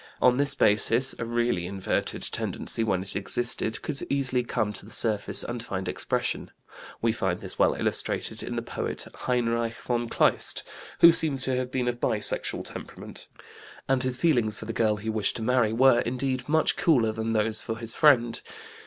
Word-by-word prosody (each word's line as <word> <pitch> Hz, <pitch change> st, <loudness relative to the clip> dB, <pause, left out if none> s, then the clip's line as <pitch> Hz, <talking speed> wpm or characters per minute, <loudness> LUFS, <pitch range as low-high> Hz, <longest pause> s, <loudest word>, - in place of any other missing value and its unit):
On 125 Hz, 0 st, +4 dB
this 140 Hz, 0 st, +1 dB
basis 115 Hz, +5 st, +2 dB
a 115 Hz, -, -3 dB
really 120 Hz, -6 st, -1 dB
inverted 95 Hz, 0 st, -2 dB
tendency, 115 Hz, -, -1 dB
when 95 Hz, -4 st, 0 dB
it 95 Hz, -, -3 dB
existed, 110 Hz, +3 st, 0 dB
could 145 Hz, -3 st, -3 dB
easily 130 Hz, -2 st, +1 dB
come 110 Hz, -3 st, -2 dB
to -, -, -7 dB
the 105 Hz, -, -13 dB
surface 110 Hz, -3 st, +3 dB
and 120 Hz, 0 st, -4 dB
find 95 Hz, -5 st, -5 dB
expression. -, -, -2 dB, 0.5 s
We 115 Hz, -, +3 dB
find 95 Hz, -5 st, -2 dB
this -, -, -5 dB
well -, -, +3 dB
illustrated -, -, -1 dB
in -, -, -5 dB
the -, -, -3 dB
poet -, -, -3 dB
Heinrich 115 Hz, -2 st, -1 dB
von 120 Hz, -1 st, -3 dB
Kleist -, -, +1 dB, 0.4 s
who 170 Hz, -, +10 dB
seems 150 Hz, -5 st, +2 dB
to 130 Hz, -1 st, +1 dB
have 125 Hz, 0 st, -2 dB
been 125 Hz, -1 st, -2 dB
of 120 Hz, 0 st, -2 dB
bisexual 110 Hz, -4 st, 0 dB
temperament, -, -, -8 dB, 0.6 s
and 135 Hz, -1 st, +1 dB
his 130 Hz, -1 st, 0 dB
feelings 120 Hz, -11 st, +2 dB
for -, -, -8 dB
the 115 Hz, -, -5 dB
girl 110 Hz, -1 st, +1 dB
he 105 Hz, +2 st, -8 dB
wished 110 Hz, -2 st, 0 dB
to 115 Hz, -, -4 dB
marry 120 Hz, -2 st, +2 dB
were, 120 Hz, +1 st, +4 dB
indeed, 130 Hz, +2 st, -2 dB
much 160 Hz, +1 st, +2 dB
cooler 125 Hz, -10 st, +3 dB
than 110 Hz, +1 st, -3 dB
those 110 Hz, 0 st, +1 dB
for 110 Hz, -, -5 dB
his 115 Hz, 0 st, -3 dB
friend. 120 Hz, -7 st, +3 dB
120 Hz, 180 wpm, -26 LUFS, 110-130 Hz, 0.6 s, who